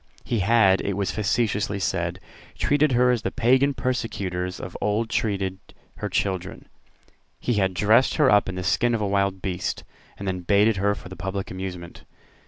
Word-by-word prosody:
He 115 - -1
had, 100 -1 +4
it 100 - -2
was 100 -1 -1
facetiously 105 -1 0
said, 90 -2 -2 0.4
treated 145 -1 +2
her 125 +1 +4
as 120 -3 0
the - - -1
Pagan 130 +4 +2
persecutors 100 -8 -3
of 90 - -8
old 110 +2 0
treated 95 -3 -1 0.4
her - - -4
children. 95 -2 -2 0.7
He 125 - -1
had 95 -1 0
dressed 110 +7 +4
her 150 -4 +4
up 105 -4 +4
in 90 - -5
the 90 - -4
skin 120 +5 +2
of 110 - -2
a 105 - 0
wild 100 -1 0
beast, 90 -1 -3 0.3
and 100 - -6
then 95 -1 -1
baited 100 +4 +3
her 100 +1 +1
for - - -11
the 95 - -9
public 95 +2 -4
amusement. 90 -2 -7
100 Hz, 180 wpm, -24 LUFS, 95-115 Hz, 0.7 s, had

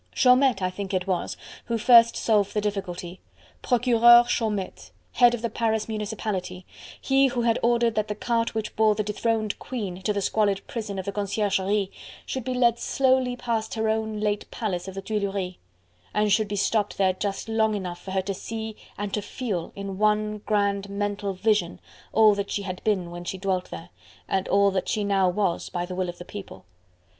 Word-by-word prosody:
Chaumette, 250 -5 +4
I 185 - 0
think 195 0 -4
it 185 -1 -1
was, 185 -3 -2 0.3
who 230 - -1
first 235 0 +6
solved 210 -3 +1
the - - +3
difficulty: 190 -3 -4 0.4
Procureur 240 -1 +6
Chaumette, 210 -6 -2 0.2
head 240 -2 +5
of 235 - -9
the 235 - 0
Paris 220 -2 0
Municipality, 205 -4 -4 0.3
he 270 0 +3
who 245 -2 -1
had 230 -1 +2
ordered 235 -1 +2
that 215 -1 -1
the 210 - -3
cart 230 +1 -1
which 220 -1 -3
bore 215 -1 +4
the 215 - -1
dethroned 215 +1 -1
queen 200 -8 -5
to 210 - 0
the 205 - -1
squalid 200 -1 0
prison 215 -4 -5
of 190 - -4
the 200 - -2
Conciergerie 200 -1 0 0.3
should 260 - -4
be 255 +1 -3
led 235 -2 +3
slowly 260 -2 +2
past 230 -3 -2
her 220 -1 0
own 220 -1 -1
late 210 -1 -1
palace 195 -6 -3
of 190 - -7
the 195 - -5
Tuileries, 200 -3 -2 0.6
and 210 0 +2
should 215 +1 +2
be 205 - -3
stopped 205 +1 0
there 190 -1 +3
just 195 +2 -4
long 220 -1 +1
enough 180 -3 -5
for - - -9
her 190 0 0
to 195 +1 -3
see 220 +2 -6 0.2
and 205 -1 -4
to 210 - 0
feel 205 -5 -4
in 195 -1 -6
one 210 0 +1
grand 200 -1 +1
mental 200 0 -2
vision 195 -3 +1 0.3
all 215 -1 +6
that 200 0 -3
she 200 - -2
had 185 -2 -6
been 190 -5 0
when 175 0 -7
she 190 - -4
dwelt 185 -1 -2
there, 85 0 -8 0.4
and 190 -1 -1
all 200 0 +4
that 190 -1 -2
she 210 - 0
now 195 -2 +2
was 180 -2 -1
by 175 0 -3
the 180 - -7
will 180 0 -2
of 175 - -7
the 175 - -9
People. 180 - -9
205 Hz, 195 wpm, -25 LUFS, 190-225 Hz, 0.6 s, first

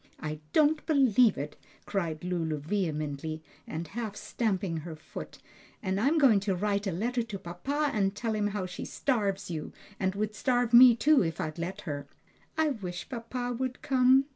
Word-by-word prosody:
"I 155 0 -4
don't 305 0 +3
believe 255 - +4
it!" 145 +2 -5 0.3
cried 170 -6 -2
Lulu 170 -4 -1
vehemently, 155 -2 -2 0.2
and 160 +1 -4
half 220 0 -4
stamping 195 -6 -1
her 160 +1 -6
foot, 155 - -9 0.5
"and 190 -1 0
I'm 280 +9 +3
going 260 -9 +6
to 195 -1 -1
write 200 +2 0
a - - 0
letter 240 +8 -1
to 225 -3 -5
papa 270 - -2
and 195 -2 +1
tell 225 +1 -2
him 210 -1 +1
how 205 -2 -2
she 180 - -6
starves 200 -9 -1
you, 155 -2 -5 0.3
and 190 -1 0
would 210 +1 -1
starve 245 +1 +1
me 245 0 +10
too 295 +4 +4
if 165 -2 -3
I'd 155 +2 -3
let 185 +4 -4
her!" 145 -4 -5 0.5
"I 315 -1 +3
wish 180 -9 -5
papa 245 +1 -3
would 260 -1 -3
come!" 260 0 +5
205 Hz, 175 wpm, -29 LUFS, 170-245 Hz, 0.5 s, me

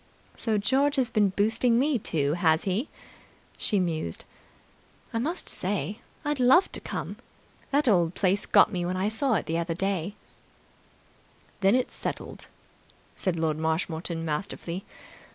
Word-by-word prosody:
"So 220 -2 -1
George 270 +7 +2
has 260 -4 +1
been 205 -2 +3
boosting 225 +4 +2
me, 275 0 +2
too, 145 -7 +1
has 160 -2 +2
he?" 200 +9 -1 0.7
She 205 - +1
mused. 160 - -2 0.9
"I 230 - 0
must 325 +9 -2
say, 205 +2 -1 0.3
I'd 295 -1 -1
love 260 +9 +5
to - - -3
come. - - -5 0.5
That 285 0 +2
old 175 -6 +3
place 195 +1 +1
got - - +6
me 180 -3 -2
when 180 +1 -2
I 195 +3 +1
saw 240 +3 +1
it 175 - -1
that 165 +1 -2
day." 195 0 -1 1.4
"That's 215 +6 +2
settled, - - -5
then," - - -11 0.7
said 185 -3 -1
Lord 160 -2 -1
Marshmoreton 165 +1 -1
masterfully. 170 +3 -4
195 Hz, 140 wpm, -27 LUFS, 170-235 Hz, 1.4 s, got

